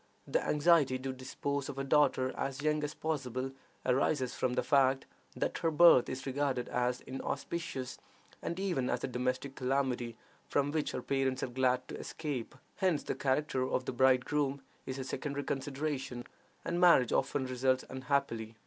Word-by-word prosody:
The - - 0
anxiety 150 -3 +4
to 130 +1 -4
dispose 135 +2 -3
of 140 - -6
a 135 - -1
daughter 135 -2 +3
as 135 +1 -3
young 150 0 +1
as 150 - -3
possible 135 -4 -2 0.3
arises 130 0 +1
from 125 - 0
the - - +1
fact 135 -2 +3 0.3
that - - -1
her 165 - +2
birth 160 -5 +7
is 130 0 -5
regarded 135 -2 -1
as 125 0 0
inauspicious, 135 0 -4 0.4
and 170 - -3
even 175 -10 0
as - - -1
a - - 0
domestic 125 +2 -2
calamity, 125 -3 -1 0.3
from 145 0 +1
which 155 -1 -1
her 125 - -3
parents 135 -1 0
are - - -2
glad 125 0 +1
to - - -5
escape. 145 -8 -4 0.2
Hence 185 -6 +1
the - - -2
character 135 0 0
of 130 - 0
the - - -3
bridegroom 135 +2 +2 0.2
is 130 - -3
a 135 - -3
secondary 140 +2 -3
consideration, 135 -3 -3 0.4
and 175 +1 -1
marriage 170 -9 +6
often 135 0 +1
results 130 0 +1
unhappily. 130 -4 -1
135 Hz, 165 wpm, -32 LUFS, 130-145 Hz, 0.4 s, birth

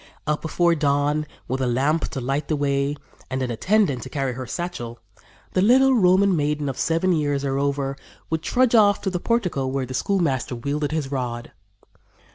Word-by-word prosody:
"Up 150 0 -1
before 170 +1 +2
dawn, 145 0 +1 0.2
with 130 +1 -2
a 130 - +1
lamp 140 +7 +1
to 135 - -5
light 135 +3 -2
the 155 - 0
way, 140 0 0 0.3
and 130 0 -2
an 125 - -2
attendant 160 - +1
to 130 - -8
carry 135 -3 -2
her 130 +1 -6
satchel, 120 -7 -5 0.6
the 185 - +2
little 260 +6 +5
Roman 190 -3 +4
maiden 150 -1 0
of 130 - -5
seven 165 +3 +1
years, 145 -3 0
or 135 0 0
over, 140 -1 -1 0.4
would 160 -1 0
trudge 250 +8 +2
off 205 -3 +5
to 190 - -2
the 180 - -2
portico 180 - 0
where 135 0 -1
the 130 - -7
schoolmaster 140 -7 0
wielded 145 +5 -2
his 155 -4 -2
rod. 120 -3 -4
145 Hz, 185 wpm, -23 LUFS, 135-175 Hz, 0.6 s, little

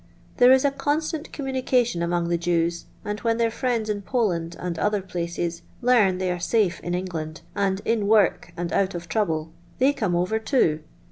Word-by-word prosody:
There 250 +1 +7
is 265 +1 +5
a 280 - +3
constant 295 +3 -2
communication 255 - 0
among 170 0 0
the 170 - +2
Jevs, 170 0 0 0.2
and 210 0 -3
vKen 230 -1 +1
their 230 -1 +1
friends 235 -2 -1
in 210 -1 -2
Poland, 180 -7 -1
and 175 -2 -4
other 210 +2 +1
places, 170 -2 -4 0.2
learn 235 -7 +4
they 185 -1 -1
are 180 - -2
eafe 185 0 +1
in 175 0 -3
England, 165 -4 -4
and 195 -1 0
in 225 -3 +1
wort 210 -6 +3
and 175 0 -3
out 195 -1 +1
of 170 0 -6
trouble, 160 -6 -1 0.3
they 270 +3 +4
come 195 -10 -1
over 185 +6 0
loo. 165 - +3
195 Hz, 185 wpm, -24 LUFS, 170-235 Hz, 0.3 s, There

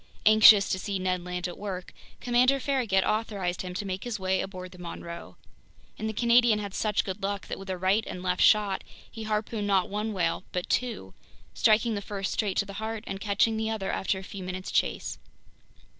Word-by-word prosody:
Anxious 215 -2 +8
to 185 - 0
see 200 +1 -2
Ned 185 -1 -1
Land 180 0 -3
at 175 - -8
work, 190 -3 -6 0.3
Commander 250 +3 +3
Farragut 245 -9 +1
authorized 205 -5 -1
him 180 -1 -6
to 200 - -3
make 190 0 -4
his 235 -4 -4
way 190 0 +1
aboard 185 -2 -7
the 180 - -14
Monroe. 170 0 -8 0.6
And 220 +1 -2
the - - -3
Canadian 235 0 +4
had 200 -2 -5
such 210 -1 0
good 190 +1 -5
luck 200 0 -2
that - - -6
with 195 0 -9
a 185 - -2
right 190 +4 +2
and 180 - -6
left 180 0 0
shot, 205 -3 +4 0.3
he 225 -1 -7
harpooned 215 0 -2
not 195 0 +2
one 210 +2 -2
whale 180 -3 -1
but 180 -1 -2
two, 230 - -1 0.4
striking 220 +1 +3
the 205 - -2
first 195 -1 -4
straight 205 -4 -1
to 205 - +2
the 200 - -9
heart 220 0 -4
and 195 - -5
catching 220 +2 +2
the 220 0 -1
other 210 -3 -2
after 190 - -1
a 190 - -7
few 190 0 -8
minutes' 185 +1 -5
chase! - - -1
200 Hz, 205 wpm, -28 LUFS, 185-220 Hz, 0.6 s, Anxious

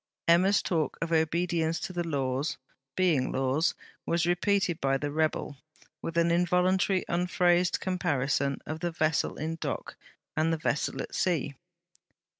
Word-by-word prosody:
Emma's 185 +4 +4
talk 160 -4 -1
of 165 0 -3
obedience 165 0 +1
to 185 - -5
the 175 -1 -1
Laws, 140 -2 -1 0.4
being 165 -9 +2
Laws, 135 +5 +1 0.3
was 170 -1 0
repeated 175 -1 +1
by 135 0 +2
the 145 +1 -3
rebel, 155 -2 -1 0.4
with 165 0 -4
an 170 0 +3
involuntary 180 +2 +2
unphrased 175 0 +2
comparison 140 -7 0
of 155 +1 -5
the 175 - -1
vessel 155 -2 0
in 160 +2 -3
dock - - -4 0.4
and 160 +1 +2
the 165 - +1
vessel 150 -1 -1
at - - -10
sea. 160 -6 0
165 Hz, 140 wpm, -29 LUFS, 150-175 Hz, 0.4 s, Emma's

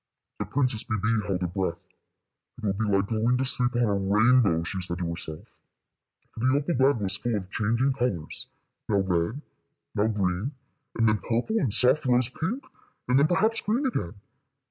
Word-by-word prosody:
The - - -2
Princess 125 -5 +1
Bébè 110 0 -1
held 95 -2 -1
her 90 - 0
breath. 90 -1 -2 0.8
"It - - -13
will 100 -2 +1
be 110 +3 -2
like 100 -1 +2
going 115 +4 +1
to 130 - 0
sleep 125 -1 +2
on 120 - +2
a 105 -3 +2
rainbow," 100 -2 +3
she 95 +2 -4
said 85 -1 +2
to 90 -1 -3
herself, 85 -2 -7 0.7
for - - -11
the 130 +3 +2
opal 145 +4 -1
bed 135 -1 +3
was 100 -1 +1
full 120 -1 -1
of 95 -2 -5
changing 120 +5 +1
colors, 120 - -3 0.4
now 100 -2 +3
red, 95 - -1 0.5
now 105 +1 +1
green, 100 +4 -1 0.4
and 115 -1 +3
then 110 0 +3
purple 120 - -1
and 130 - 0
soft 130 +6 +3
rose 125 -1 +3
pink, 205 - -3 0.4
and 125 +2 +4
then, 145 - +4
perhaps, 215 +7 +2
green 235 +7 0
again. 110 - -2
110 Hz, 185 wpm, -26 LUFS, 100-130 Hz, 0.8 s, and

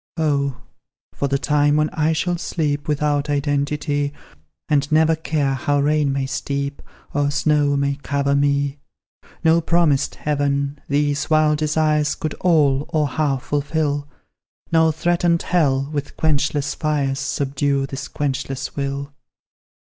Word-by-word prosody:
"Oh, 140 -4 0 0.5
for 140 - -1
the 140 0 +1
time 145 +1 +2
when 150 0 +1
I 155 0 +1
shall 175 +2 -1
sleep 145 -4 -2
Without 150 -1 0
identity. 145 0 -1 0.5
And 145 -1 +1
never 160 +1 +4
care 150 -3 -1
how 145 +2 0
rain 150 0 +2
may 135 0 -1
steep, 140 +1 -3 0.3
Or 145 0 +1
snow 145 0 +2
may 140 0 0
cover 140 0 0
me! 140 0 +1 0.6
No 165 +1 +4
promised 160 -4 +2
heaven, 140 -1 -1
these 145 0 0
wild 155 -1 +3
desires 155 -1 +1
Could 155 -2 -3
all, 150 -5 +3
or 150 -2 +1
half 140 -2 -1
fulfil; 145 0 -1 0.6
No 160 -1 +4
threatened 170 +1 +1
hell, 140 -6 +1
with 145 -1 -4
quenchless 145 -1 0
fires, 140 -3 -1
Subdue 140 0 0
this 135 0 -6
quenchless 135 -2 -3
will!" 140 0 -3
145 Hz, 130 wpm, -21 LUFS, 140-155 Hz, 0.6 s, never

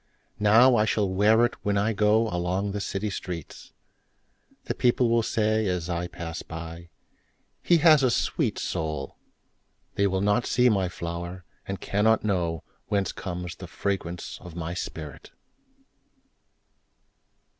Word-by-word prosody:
Now 115 +5 +6
I 105 - +3
shall 105 -2 +1
wear 105 +5 +4
itWhen 105 -3 -2
I 105 +3 +1
goAlong 100 -3 +1
the 100 0 -3
city 100 +2 -3
streets:The 85 -5 -10
people 120 0 +2
will 115 0 +4
sayAs 105 -6 0
I 85 +1 -2
pass 85 -1 -6
by—"He 85 - -5
has 155 -2 +6
a 130 - +3
sweet 115 - 0
soul!"They 80 +5 -5
will 95 -1 -1
not 105 +4 +2
see 125 0 +4
my 95 -5 +1
flower, 85 0 -6 0.2
And 95 0 -4
cannot 110 +2 +2
knowWhence 95 +1 -2
comes 90 -2 -6
the 90 - -9
fragrance 90 -1 -4
of 90 -2 -11
my 85 0 -4
spirit! 80 -4 -7
95 Hz, 115 wpm, -26 LUFS, 85-110 Hz, 0.2 s, Now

